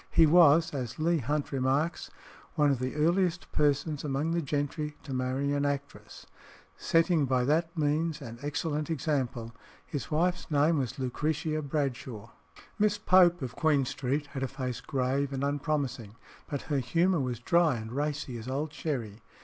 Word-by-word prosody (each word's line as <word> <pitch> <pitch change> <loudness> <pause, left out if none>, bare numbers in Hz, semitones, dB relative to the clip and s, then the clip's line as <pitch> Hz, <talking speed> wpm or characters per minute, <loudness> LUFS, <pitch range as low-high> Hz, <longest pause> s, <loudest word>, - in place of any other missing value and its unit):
He 165 - +5
was, 160 0 +6
as 125 -4 -4
Leigh 165 +1 +2
Hunt 145 +3 -2
remarks, 135 +5 0 0.5
one 150 -3 +4
of 135 - 0
"the 130 +2 -3
earliest 175 +3 +1
persons 150 0 +1
among 145 +2 -1
the 170 0 +1
gentry 145 +1 -3
to 140 - -6
marry 130 +2 -1
an 145 0 0
actress," 140 0 -4 0.5
setting 165 -2 +2
by 130 -1 +1
that 165 +5 0
means 155 +2 0
an 120 -4 -9
excellent 150 +1 -2
example. 130 -7 -2 0.3
His 145 -4 -5
wife's 175 +4 0
name 150 +1 +3
was 130 0 -3
Lucretia 150 +4 -1
Bradshaw. 130 -6 -3 0.5
Miss 210 0 +3
Pope, 180 -5 +4
of 125 -1 -5
Queen 150 -4 +2
Street, 135 +3 -2
had 135 - -4
a 135 - 0
face 130 -2 -4
grave 135 0 -1
and 135 0 -3
unpromising, 140 -6 -2 0.3
but 145 - -3
her 145 -3 0
humour 170 +7 +2
was 125 -3 -2
dry 170 +2 +3
and 110 -1 -6
racy 145 -2 -3
as 115 - -9
old 145 +4 -3
sherry. 115 -10 -4
145 Hz, 160 wpm, -29 LUFS, 130-160 Hz, 0.5 s, was